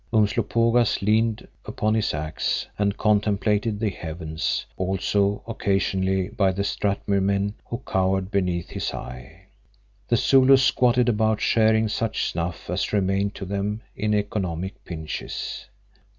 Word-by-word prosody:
Umslopogaas 115 Hz, +1 st, +2 dB
leaned 110 Hz, +1 st, +1 dB, 0.2 s
upon 110 Hz, 0 st, -1 dB
his 110 Hz, -1 st, +1 dB
axe 75 Hz, +1 st, -2 dB
and 100 Hz, 0 st, +1 dB
contemplated 105 Hz, 0 st, +1 dB
the 110 Hz, -2 st, 0 dB
heavens, 80 Hz, -2 st, -3 dB
also 100 Hz, +2 st, 0 dB
occasionally 95 Hz, -3 st, 0 dB
the 100 Hz, -1 st, +1 dB
Strathmuir 100 Hz, 0 st, 0 dB
men 100 Hz, +1 st, 0 dB
who 120 Hz, +2 st, -5 dB
cowered 95 Hz, 0 st, 0 dB
beneath 90 Hz, -3 st, -1 dB
his -, -, -3 dB
eye. 65 Hz, +9 st, -9 dB, 0.6 s
The 120 Hz, -, +3 dB
Zulus 130 Hz, +1 st, +5 dB
squatted 125 Hz, -1 st, +3 dB
about 110 Hz, -2 st, +2 dB
sharing 110 Hz, 0 st, +3 dB
such 110 Hz, +1 st, -1 dB
snuff 85 Hz, +1 st, -4 dB
as -, -, -1 dB
remained 100 Hz, 0 st, 0 dB
to 95 Hz, -, -6 dB
them 100 Hz, +3 st, -3 dB
in 105 Hz, +1 st, 0 dB
economic 95 Hz, -3 st, -3 dB
pinches. 80 Hz, -3 st, -5 dB
100 Hz, 120 wpm, -24 LUFS, 95-110 Hz, 0.6 s, Zulus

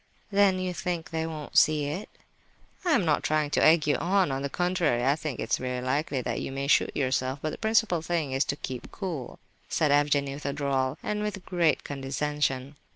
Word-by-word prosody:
"Then 200 Hz, -2 st, +4 dB
you 185 Hz, -1 st, -2 dB
think 170 Hz, 0 st, -3 dB
they 160 Hz, 0 st, -1 dB
won't 155 Hz, -2 st, -7 dB
see 155 Hz, -2 st, +5 dB
it?" 155 Hz, +9 st, -4 dB, 0.7 s
"I 350 Hz, -3 st, +2 dB
am 195 Hz, -, +3 dB
not 155 Hz, -2 st, +2 dB
trying 155 Hz, -1 st, 0 dB
to -, -, +2 dB
egg 155 Hz, -1 st, +6 dB
you 145 Hz, -, +2 dB
on. 185 Hz, -3 st, +2 dB
On 135 Hz, 0 st, -2 dB
the 140 Hz, -, -2 dB
contrary, 175 Hz, -8 st, +1 dB
I 140 Hz, +2 st, +4 dB
think 155 Hz, -4 st, -5 dB
it 110 Hz, -, -3 dB
very 125 Hz, 0 st, -3 dB
likely 135 Hz, +2 st, -1 dB
that -, -, -2 dB
you -, -, -4 dB
may 135 Hz, +1 st, -3 dB
shoot 140 Hz, -, +2 dB
yourself; 130 Hz, -1 st, 0 dB
but 155 Hz, -, -1 dB
the -, -, -8 dB
principal 220 Hz, -6 st, +2 dB
thing 165 Hz, -4 st, -1 dB
is 135 Hz, +2 st, +2 dB
to -, -, -2 dB
keep 130 Hz, -3 st, -6 dB
cool," 170 Hz, -10 st, -5 dB, 0.3 s
said 155 Hz, -3 st, +2 dB
Evgenie 145 Hz, -1 st, +2 dB
with 140 Hz, 0 st, -6 dB
a 140 Hz, -, -1 dB
drawl, 135 Hz, -1 st, 0 dB
and 210 Hz, 0 st, -2 dB
with 205 Hz, -3 st, -4 dB
great 175 Hz, -4 st, +1 dB
condescension. 140 Hz, 0 st, -2 dB
150 Hz, 210 wpm, -27 LUFS, 135-175 Hz, 0.7 s, egg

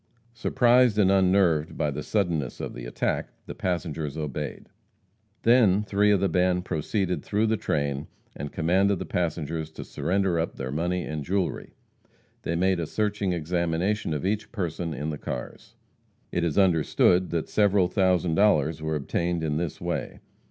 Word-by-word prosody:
Surprised 120 Hz, -1 st, +3 dB
and 95 Hz, -2 st, +4 dB
unnerved 95 Hz, -5 st, +3 dB
by 75 Hz, -, 0 dB
the 70 Hz, -, -4 dB
suddenness 85 Hz, -, -1 dB
of -, -, -5 dB
the -, -, -8 dB
attack, -, -, -2 dB, 0.2 s
the -, -, -7 dB
passengers 80 Hz, -4 st, -3 dB
obeyed. 75 Hz, -1 st, -5 dB, 0.8 s
Then 110 Hz, -4 st, +5 dB
three 105 Hz, 0 st, +2 dB
of 100 Hz, -2 st, +4 dB
the 100 Hz, -, +2 dB
band 90 Hz, +1 st, +1 dB
proceeded 90 Hz, +3 st, -1 dB
through 105 Hz, +2 st, +1 dB
the 110 Hz, 0 st, +2 dB
train 70 Hz, -7 st, -2 dB, 0.3 s
and 70 Hz, +1 st, -6 dB
commanded 95 Hz, +4 st, +2 dB
the -, -, -5 dB
passengers 80 Hz, -2 st, -2 dB
to -, -, -7 dB
surrender 95 Hz, -2 st, 0 dB
up 80 Hz, -, -2 dB
their 65 Hz, -1 st, -5 dB
money 90 Hz, +4 st, -1 dB
and 75 Hz, -, -4 dB
their -, -, -7 dB
jewelry. 95 Hz, 0 st, -2 dB, 0.7 s
They 85 Hz, -, -2 dB
made 95 Hz, +1 st, +2 dB
a 85 Hz, -, -2 dB
searching 105 Hz, -1 st, -1 dB
examination 85 Hz, +4 st, -1 dB
of 75 Hz, -, -3 dB
each 105 Hz, +1 st, -1 dB
person 85 Hz, -5 st, -3 dB
in 75 Hz, +2 st, -3 dB
the 75 Hz, -, -6 dB
cars. -, -, -7 dB, 0.6 s
It 85 Hz, -, 0 dB
is 85 Hz, -4 st, -1 dB
understood 90 Hz, 0 st, +3 dB
that 85 Hz, -2 st, -2 dB
several 100 Hz, -3 st, +3 dB
thousand 90 Hz, -3 st, +2 dB
dollars 80 Hz, -5 st, +3 dB
were 80 Hz, 0 st, -1 dB
obtained 85 Hz, +3 st, -1 dB
in 75 Hz, -2 st, 0 dB
this 85 Hz, -2 st, -3 dB
way. -, -, -4 dB
90 Hz, 165 wpm, -26 LUFS, 80-100 Hz, 0.8 s, Then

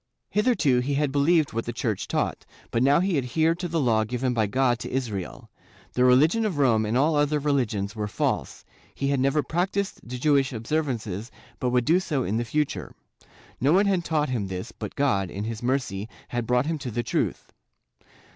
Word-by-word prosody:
Hitherto 210 Hz, -, +3 dB
he 140 Hz, +3 st, -1 dB
had 145 Hz, -1 st, +1 dB
believed 145 Hz, +2 st, +3 dB
what 115 Hz, +1 st, -2 dB
the 120 Hz, -, -3 dB
Church 110 Hz, -4 st, -2 dB
taught, -, -, -1 dB, 0.3 s
but 115 Hz, -, +1 dB
now 140 Hz, +5 st, +4 dB
he 185 Hz, -5 st, +1 dB
adhered 160 Hz, +6 st, +1 dB
to 180 Hz, -, -2 dB
the 165 Hz, -1 st, -1 dB
Law 115 Hz, -6 st, +3 dB
given 125 Hz, +3 st, -1 dB
by 110 Hz, -3 st, +1 dB
God 125 Hz, +2 st, +1 dB
to -, -, -5 dB
Israel; 110 Hz, -8 st, -4 dB, 0.4 s
the 125 Hz, -, +2 dB
religion 150 Hz, -, +5 dB
of 200 Hz, -8 st, -1 dB
Rome 115 Hz, -6 st, +3 dB
and 115 Hz, +3 st, +1 dB
all 150 Hz, +4 st, +3 dB
other 145 Hz, +1 st, +2 dB
religions 120 Hz, -8 st, -1 dB
were 105 Hz, -1 st, -2 dB
false; 100 Hz, -, -2 dB, 0.3 s
he 140 Hz, -, -1 dB
had 140 Hz, -1 st, +1 dB
never 140 Hz, +3 st, +2 dB
practised 190 Hz, +4 st, -1 dB
the 125 Hz, +1 st, -6 dB
Jewish 140 Hz, 0 st, +2 dB
observances 115 Hz, -, -2 dB, 0.3 s
but 125 Hz, -, 0 dB
would 125 Hz, -1 st, +1 dB
do 170 Hz, +4 st, +4 dB
so 150 Hz, -8 st, -1 dB
in 110 Hz, 0 st, -1 dB
the 120 Hz, -, -1 dB
future; 150 Hz, +5 st, -2 dB, 0.6 s
no 140 Hz, +5 st, +3 dB
one 195 Hz, +3 st, +4 dB
had 190 Hz, -3 st, +1 dB
taught 155 Hz, -3 st, 0 dB
him 115 Hz, -6 st, -1 dB
this, 95 Hz, +3 st, -5 dB
but -, -, -7 dB
God, 100 Hz, -10 st, +1 dB
in 100 Hz, +3 st, -5 dB
his 110 Hz, 0 st, -4 dB
mercy, 120 Hz, -5 st, -1 dB, 0.2 s
had 120 Hz, -2 st, -3 dB
brought 125 Hz, +1 st, +2 dB
him 160 Hz, 0 st, -2 dB
to 135 Hz, -3 st, -5 dB
the 120 Hz, +1 st, -2 dB
truth. -, -, -2 dB
130 Hz, 200 wpm, -25 LUFS, 115-150 Hz, 0.6 s, religion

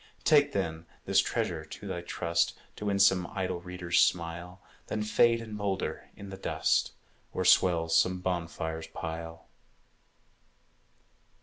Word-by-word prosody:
Take, 145 Hz, -2 st, +5 dB
then, 80 Hz, -4 st, -2 dB, 0.2 s
this -, -, +4 dB
treasure -, -, -1 dB
to -, -, -10 dB
thy 85 Hz, -, -3 dB
trust, 85 Hz, -1 st, 0 dB, 0.2 s
To 105 Hz, -, -6 dB
win 100 Hz, -1 st, +1 dB
some 95 Hz, -3 st, +4 dB
idle 95 Hz, -3 st, -2 dB
reader's 90 Hz, -1 st, -1 dB
smile, 85 Hz, +1 st, 0 dB, 0.3 s
Then 105 Hz, 0 st, -2 dB
fade 115 Hz, +2 st, +4 dB
and 110 Hz, -1 st, -9 dB
moulder 100 Hz, -2 st, -3 dB
in 100 Hz, -, -9 dB
the 95 Hz, -, -7 dB
dust, -, -, +1 dB, 0.4 s
Or -, -, -1 dB
swell 85 Hz, -3 st, +5 dB
some 90 Hz, +3 st, +3 dB
bonfire's 80 Hz, -3 st, -3 dB
pile. 80 Hz, 0 st, -6 dB
90 Hz, 130 wpm, -29 LUFS, 85-100 Hz, 0.4 s, Take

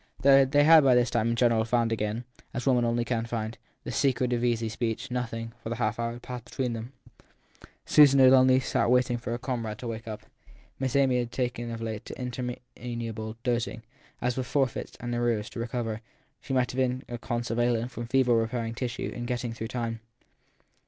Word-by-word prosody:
Though 135 Hz, 0 st, +7 dB
they 145 Hz, +2 st, +3 dB
had 160 Hz, 0 st, +8 dB
by 130 Hz, -2 st, +5 dB
this 125 Hz, 0 st, +3 dB
time, 115 Hz, -1 st, +1 dB
in 115 Hz, -, +1 dB
gen 120 Hz, 0 st, +4 dB
eral, 110 Hz, -1 st, +1 dB
found 115 Hz, -1 st, +2 dB
again 110 Hz, +1 st, -2 dB, 0.3 s
as 125 Hz, -, -3 dB
women 125 Hz, -3 st, +3 dB
only 120 Hz, 0 st, 0 dB
can 115 Hz, -2 st, -1 dB
find 115 Hz, -1 st, -3 dB, 0.3 s
the -, -, -5 dB
secret 125 Hz, -2 st, +1 dB
of 120 Hz, 0 st, 0 dB
easy 115 Hz, -2 st, +1 dB
speech, 115 Hz, +1 st, -3 dB
nothing, 115 Hz, -2 st, -3 dB
for -, -, -6 dB
the 115 Hz, -, -2 dB
half 110 Hz, -1 st, -1 dB
hour, 115 Hz, 0 st, -1 dB
had 120 Hz, -, -11 dB
passed 125 Hz, -2 st, -7 dB
between 125 Hz, 0 st, -2 dB
them: 115 Hz, +2 st, -6 dB, 0.9 s
Susan 140 Hz, -2 st, +6 dB
had 130 Hz, 0 st, +8 dB
only 130 Hz, 0 st, +6 dB
sat 125 Hz, -, 0 dB
waiting 125 Hz, -1 st, +3 dB
for 115 Hz, -, -6 dB
her 120 Hz, -, -1 dB
comrade 115 Hz, -4 st, -3 dB
to 120 Hz, -, -7 dB
wake 115 Hz, -1 st, -5 dB
up. 110 Hz, -1 st, -6 dB, 0.6 s
Miss 130 Hz, -1 st, -1 dB
Amy 135 Hz, -2 st, +4 dB
had 120 Hz, -1 st, -3 dB
taken 120 Hz, -2 st, -2 dB
of 115 Hz, -1 st, -5 dB
late 110 Hz, -2 st, -4 dB
to -, -, -8 dB
interminable 120 Hz, -3 st, -5 dB
dozing 120 Hz, -2 st, -1 dB, 0.4 s
as 125 Hz, +1 st, +1 dB
if -, -, -13 dB
with 125 Hz, -, -3 dB
forfeits 135 Hz, -3 st, -1 dB
and 120 Hz, 0 st, -4 dB
arrears 120 Hz, -2 st, 0 dB
to -, -, -7 dB
recover; 115 Hz, -2 st, -3 dB, 0.4 s
she -, -, -8 dB
might 125 Hz, -2 st, +2 dB
have 125 Hz, -, -8 dB
been 130 Hz, 0 st, 0 dB
a 120 Hz, -1 st, -6 dB
convalescent 120 Hz, +1 st, -1 dB
from 120 Hz, 0 st, -6 dB
fever 130 Hz, -1 st, +3 dB
repairing 115 Hz, 0 st, -1 dB
tissue 125 Hz, 0 st, -3 dB
and 120 Hz, 0 st, -4 dB
getting 120 Hz, -1 st, -2 dB
through 115 Hz, -1 st, -5 dB
time. 115 Hz, -1 st, -3 dB
120 Hz, 205 wpm, -28 LUFS, 115-125 Hz, 0.9 s, had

